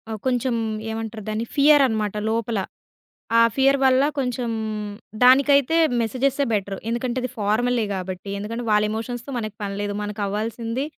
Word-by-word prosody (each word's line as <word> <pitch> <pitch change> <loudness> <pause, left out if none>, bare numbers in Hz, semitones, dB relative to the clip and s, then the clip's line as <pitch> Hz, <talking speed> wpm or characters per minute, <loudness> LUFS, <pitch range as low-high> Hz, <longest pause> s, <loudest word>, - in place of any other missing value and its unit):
ఆహ్, 220 - -4
కొంచెం 250 -1 +1 0.4
ఏమంటారు 220 -1 -5
దాన్ని? 215 +2 -2
ఫియర్ 290 0 +6
అనమాట 215 -3 -2
లోపల. 230 -1 -1 0.8
ఆ - - +7 0.2
ఫియర్ 275 +1 +4
వల్ల 260 +1 +5 0.2
కొంచెం 250 -2 -1 0.7
దానికైతే 280 +4 +5 0.3
మెసేజెసే 265 +4 0
బెటర్. 195 -1 -1
ఎందుకంటే 240 +2 -2
అది 255 - -3
ఫార్మలే 225 +3 +1
గాబట్టి. 185 +1 -5
ఎందుకంటే 230 +4 -5
వాళ్ళ 210 0 +4
ఎమోషన్స్‌తో 240 +4 -5
మనకు 215 -2 -5
పని 200 -1 -3
లేదు. 205 0 -2
మనకు 210 0 -5
అవ్వాల్సింది 230 +5 -3
230 Hz, 140 wpm, -23 LUFS, 210-255 Hz, 0.8 s, ఆ